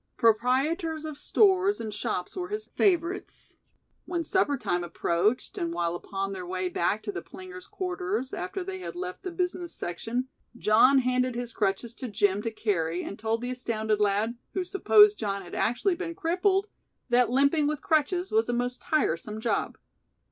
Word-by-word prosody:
Proprietors 280 - +2
of 310 -2 -5
stores 390 0 +3
and 215 -2 -4
shops 180 -3 -3
were 360 -1 -3
his 425 +2 -4
favorites. 360 -1 -1 0.5
When 345 -2 -2
supper 325 -6 +1
time 175 -6 -1
approached 175 +6 0
and 170 -1 -1
while 170 0 -1
upon 195 +2 -4
their 185 -1 -5
way 185 +1 -2
back 200 +5 0
to 210 - -3
the 175 -3 -5
plingers' 370 - -10
quarters, 370 -7 -3
after 185 - -4
they 375 0 -5
had 365 - -6
left 365 +1 -5
the 375 - -4
business 355 -1 -3
section, 230 +9 -3 0.3
John 235 +6 +5
handed 255 -1 +1
his 240 -1 -4
crutches 210 +3 -1
to 255 - -6
Jim 205 -2 +1
to 230 - -2
carry, 180 -6 -1
and 200 - -7
told 225 +1 -1
the 250 - -2
astounded 220 -4 -1
lad, 210 +3 +1 0.2
who 375 - +1
supposed 415 +2 +5
John 200 -2 -2
had 175 - -12
actually 300 - +1
been 335 -1 -5
crippled, 380 +3 +1 0.4
that 245 -1 +4
limping 280 +4 +3
with 300 -1 -2
crutches 345 +4 +1
was 440 - +2
a - - +1
"most 245 +1 -2
tiresome 215 - 0
job." 220 -3 -1
250 Hz, 170 wpm, -28 LUFS, -, 0.5 s, John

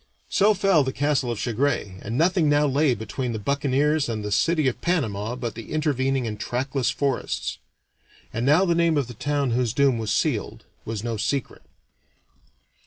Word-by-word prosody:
So 210 +2 +4
fell 190 -6 +3
the 130 - -2
castle 140 -2 0
of 120 - -2
Chagres, 115 -5 -1
and 115 +4 -4
nothing 170 -1 +3
now 145 0 +3
lay 140 -1 +2
between 115 +3 -4
the - - -2
buccaneers 140 +4 +1
and 110 -2 -3
the 105 - -4
city 155 +5 +2
of 125 -1 -2
Panama 115 - -1
but 120 -3 -4
the 115 +1 -9
intervening 135 -4 0
and 105 -2 -4
trackless 130 +2 -1
forests. 140 -3 -2 0.7
And 115 +2 -2
now 150 +8 +4
the 170 - +2
name 170 -2 +2
of 140 - +1
the 120 - -9
town 140 +2 -1
whose 120 -1 0
doom 135 -3 +3
was 110 -1 -2
sealed 115 0 -1 0.2
was 110 -2 -4
no 115 -2 -2
secret. 135 +5 -2
130 Hz, 175 wpm, -24 LUFS, 115-150 Hz, 0.7 s, So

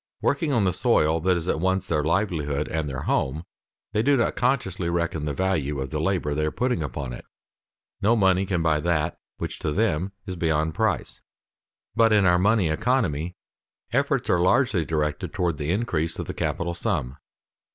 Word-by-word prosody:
Working 145 +2 0
on 120 -6 +2
the 90 -2 +2
soil 80 +1 +2
that 90 +1 +2
is 85 0 -4
at 80 - 0
once 95 +2 +1
their 75 - 0
livelihood 80 -4 0
and 80 -2 -2
their 65 -1 -4
home, 75 +5 0 0.5
they 105 - +2
do 140 +4 +3
not 120 - +1
consciously 120 -9 0
reckon 85 -3 -1
the 75 - -1
value 75 -7 0
of 65 0 -4
the 75 -1 -2
labor 80 -4 0
they 75 +1 -1
are 75 - +1
putting 125 0 -1
upon 70 -3 -4
it. - - -8 0.8
No 110 +3 +4
money 95 -2 +3
can 90 -4 0
buy 80 -2 +2
that 85 0 0 0.2
which - - -5
to 75 - -2
them 95 -1 0
is 95 -2 -4
beyond 80 -2 0
price. - - -1 0.7
But, 115 -1 +4
in 105 -2 +4
our 90 0 +4
money 100 -1 +3
economy, 90 - 0 0.6
efforts - - +1
are 90 - +3
largely 95 - +3
directed 75 -1 -2
toward 85 -6 -1
the 75 0 -2
increase 85 -5 -1
of - - -4
the - - -5
capital 85 0 -2
sum. 85 - -2
85 Hz, 185 wpm, -25 LUFS, 75-95 Hz, 0.8 s, No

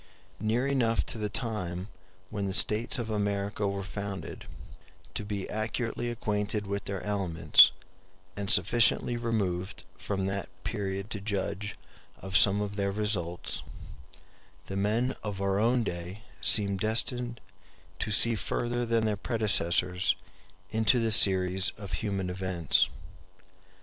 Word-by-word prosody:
Near 115 +4 0
enough 125 -5 +1
to 115 - -7
the 105 -1 -2
time 100 -5 -2 0.4
when 100 -2 -2
the 95 - -1
states 110 +1 +4
of 115 -3 -4
America 100 0 -1
were 100 0 -3
founded, 100 -3 -6 0.7
to - - -4
be 100 -2 -4
accurately 115 +2 -3
acquainted 105 -2 -2
with 100 0 -4
their 100 -2 -4
elements, 90 -7 +5 0.6
and 100 -1 -3
sufficiently 115 +5 +4
removed 100 -6 -2
from 95 -1 -3
that 100 0 -3
period 100 -1 -4
to 100 - -4
judge 100 0 -3 0.4
of 95 0 -7
some 105 -2 +5
of 100 0 -4
their 100 -1 0
results, 95 - -2 1.0
the 95 - -6
men 110 +6 0
of 105 -3 -4
our 100 0 0
own 120 +2 +2
day 90 +2 -6 0.2
seem 100 -2 +4
destined 120 +3 -1 0.6
to 110 - -2
see 115 +3 +5
further 120 +4 -2
than 115 -1 +1
their 105 -1 +1
predecessors 95 -6 +1 0.6
into 110 +3 +3
the 115 -1 0
series 95 -2 +5
of 100 -3 -9
human 100 -3 -2
events. 90 -4 +1
100 Hz, 130 wpm, -29 LUFS, 95-110 Hz, 1.0 s, elements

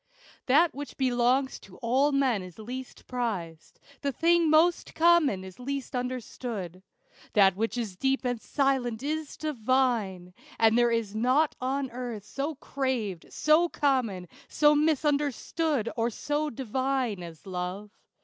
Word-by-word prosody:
That 310 +6 +4
which 285 +1 -8
belongs 255 +1 +1
to 185 - -15
all 265 +4 +2
men 265 -7 +2
is 185 -2 -11
least 250 +4 -8
prized; 190 -11 -4 0.2
The 280 - 0
thing 335 +3 +3
most 330 +3 +3
common 320 - +4
is 190 +2 -11
least 275 +1 -4
understood. 240 -7 -4 0.5
That 195 -3 +5
which 225 +4 -2
is 215 -6 -4
deep 270 +3 0
and 245 -2 -1
silent 265 -4 0
is 305 0 -3
divine; 235 - 0 0.2
And 225 0 +4
there 240 0 +4
is 230 -3 -1
nought 255 +7 +2
on 265 +1 -1
earth 235 -4 -6
so 285 +7 -3
craved, 255 - -3
so 315 +3 +3
common, 245 - 0 0.2
So 295 0 +4
misunderstood, 295 -2 +1
or 230 0 +1
so 295 +6 -2
divine, 255 -3 -2
as 165 -3 -10
Love. 185 +2 -5
255 Hz, 135 wpm, -28 LUFS, 215-280 Hz, 0.5 s, That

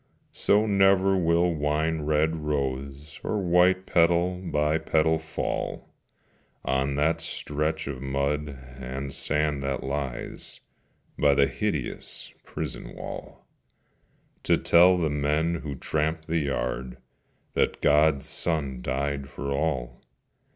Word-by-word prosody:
So 105 +2 +3
never 95 -1 +4
will 85 -1 +2
wine 75 +1 0
red 75 +2 +1
rose 70 -1 -3
or 105 - -1
white, 90 +1 +3
Petal 85 +2 +2
by 75 -2 +1
petal, 80 0 +2
fall 80 0 -4 0.7
On 65 +2 0
that 75 +3 +1
stretch 75 +2 -2
of 70 -2 -5
mud 70 +2 -1 0.3
and 65 +1 -5
sand 75 0 0
that 70 -1 -2
lies 70 -2 -4 0.6
By 70 -1 +4
the 70 0 +5
hideous 75 - -4
prison - - -6
wall, - - -8 1.0
To - - +3
tell 90 +2 +6
the 80 -4 0
men 75 +3 +1
who 75 -3 -5
tramp 80 +4 -1
the 80 +1 0
yard 65 -3 -2 0.6
That - - +1
God's 75 -1 +4
Son 70 -7 -2
died 70 +1 -2
for 70 0 -5
all. 65 -5 -2
75 Hz, 115 wpm, -26 LUFS, 70-80 Hz, 1.0 s, tell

